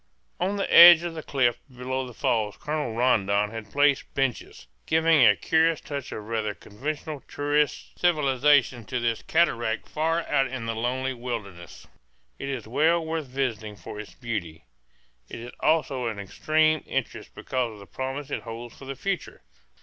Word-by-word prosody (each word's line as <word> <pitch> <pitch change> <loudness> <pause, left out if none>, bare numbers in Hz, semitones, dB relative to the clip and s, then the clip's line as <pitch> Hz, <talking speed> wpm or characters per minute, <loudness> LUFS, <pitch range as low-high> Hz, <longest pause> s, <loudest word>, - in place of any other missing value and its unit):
On 190 +3 0
the 200 - -2
edge 170 0 +11
of 175 -1 -4
the 160 - -6
cliff 120 -5 +1
below 130 +1 -4
the 125 - -10
falls 105 -3 0
Colonel 150 -6 -3
Rondon 105 -4 +2
had 110 -2 -7
placed 145 -1 +2
benches, 130 - -2 0.2
giving 160 -3 +4
a 105 - +6
curious 160 - +2
touch 140 -3 -6
of 105 - -6
rather 110 -1 -2
conventional 145 +6 -6
tourist 145 0 -1
civilization 140 -6 +3
to 125 - -3
this 115 -1 -1
cataract 120 -9 0
far 165 +2 0
out 135 -2 +2
in 130 -2 -5
the 115 - -2
lonely 130 +3 -1
wilderness. 110 -9 -7 0.5
It 140 - -4
is 125 -6 -4
well 160 +7 +2
worth 160 -2 -3
visiting 120 -5 -3
for 105 - -9
its 105 - -9
beauty. 90 -10 -5 0.6
It - - -7
is 120 +1 -8
also 150 -5 +1
of 115 -3 -3
extreme 155 +10 +1
interest - - -4
because 125 -3 -2
of - - -12
the 100 - -12
promise 135 +5 -5
it - - -2
holds 115 0 -8
for 135 - -12
the 135 +1 -5
future. 195 +7 -4
130 Hz, 165 wpm, -26 LUFS, 115-150 Hz, 0.6 s, edge